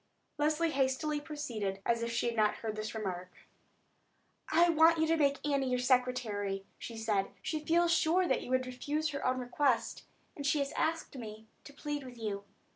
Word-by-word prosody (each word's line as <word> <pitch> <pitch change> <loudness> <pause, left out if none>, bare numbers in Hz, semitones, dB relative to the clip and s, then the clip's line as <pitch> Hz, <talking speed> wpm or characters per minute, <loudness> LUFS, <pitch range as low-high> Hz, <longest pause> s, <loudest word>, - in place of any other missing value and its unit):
Leslie 310 +2 +2
hastily 280 +2 0
proceeded, 235 -11 -4
as 235 0 +2
if 235 0 -2
she 230 - 0
had 235 -1 0
not 215 -1 +3
heard 220 -2 -4
this 215 +1 -4
remark. 185 -4 -4 1.2
"I 340 +2 +5
want 330 0 +6
you 320 - +3
to 325 +1 +3
make 285 -2 +1
Annie 275 -2 +1
your 250 - +1
secretary," 245 -6 0
she 230 - -7
said. 210 -3 0
"She 315 - -1
feels 340 +2 +3
sure 350 +3 +3
that - - +1
you - - -8
would 255 0 +2
refuse 290 +5 -2
her 280 -1 -4
own 255 0 +1
request, 250 0 0 0.3
and 285 - -6
she 290 +2 +2
has 280 0 -1
asked 325 -2 -1
me 220 -3 -8 0.2
to - - -10
plead 295 0 -4
with 250 -2 -10
you. 205 -3 -4
255 Hz, 190 wpm, -32 LUFS, 225-300 Hz, 1.2 s, want